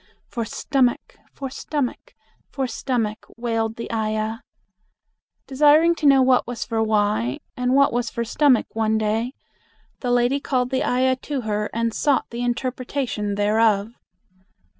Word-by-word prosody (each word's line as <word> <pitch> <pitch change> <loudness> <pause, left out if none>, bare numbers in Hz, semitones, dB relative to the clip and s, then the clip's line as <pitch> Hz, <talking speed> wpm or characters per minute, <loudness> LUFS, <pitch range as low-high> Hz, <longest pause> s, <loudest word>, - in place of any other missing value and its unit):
For 230 -2 -4
stomach! 255 +1 0 0.2
For 270 -2 -6
stomach! 280 -1 -4 0.3
For 270 -1 -2
stomach!" 235 -4 -2
wailed 225 -2 -1
the 230 - -6
ayah. 220 0 -1 1.1
Desiring 300 +5 +5
to 300 - +1
know 270 -1 +6
what 255 -2 +3
was 245 -1 -4
for 225 0 -1
why, 205 - +1 0.2
and 250 +1 +1
what 280 -2 +4
was 240 -1 -1
for 235 - -3
stomach 270 +1 +3
one 220 0 +1
day, 220 +4 -1 0.7
the 250 - -3
lady 245 +3 +2
called 255 -2 -1
the 260 - +1
ayah 260 +1 +2
to 275 0 -4
her 210 -2 -2
and 230 0 -1
sought 285 +2 +1
the 235 +1 -4
interpretation 245 -3 -2
thereof. 210 +1 +2
240 Hz, 140 wpm, -22 LUFS, 220-260 Hz, 1.1 s, know